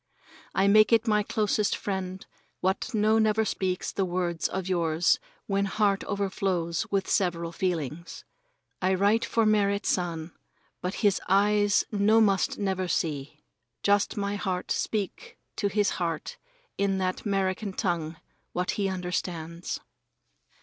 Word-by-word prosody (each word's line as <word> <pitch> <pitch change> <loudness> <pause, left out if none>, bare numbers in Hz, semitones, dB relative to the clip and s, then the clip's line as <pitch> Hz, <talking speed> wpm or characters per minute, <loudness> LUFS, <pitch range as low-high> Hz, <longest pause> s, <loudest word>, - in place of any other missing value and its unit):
I 195 - +3
make 215 +2 +6
it 230 +1 +4
my 210 -1 +3
closest 210 0 0
friend 190 -1 -4 0.3
what 190 +7 -1
no 215 +1 +3
never 220 0 +3
speaks 185 -2 -2
the 195 - -1
words 175 -2 -1
of 190 -1 -4
yours 170 -2 +2 0.3
when 200 0 +1
heart 200 0 +1
overflows 190 -4 -1
with 195 -1 0
several 170 -4 0
feelings. 170 -3 -3 0.6
I 190 +1 +2
write 205 +4 +3
for 230 -1 +1
Merrit 200 -1 +2
San, 170 -2 -1 0.5
but 180 +2 -3
his 200 - +3
eyes 205 +1 +3
no 210 +1 +4
must 200 -3 +2
never 190 -2 -1
see. 150 -3 -2 0.4
Just 205 +1 +2
my 200 0 -1
heart 185 -2 -3
speak 205 -4 -2 0.2
to 205 - +1
his 205 0 +1
heart 165 -3 -3 0.4
in 195 -1 +1
that 185 -1 -2
'Merican 195 0 -1
tongue 170 -5 -1 0.4
what 180 0 0
he 200 -2 -1
understands. 175 -2 -3
190 Hz, 135 wpm, -27 LUFS, 180-205 Hz, 0.6 s, make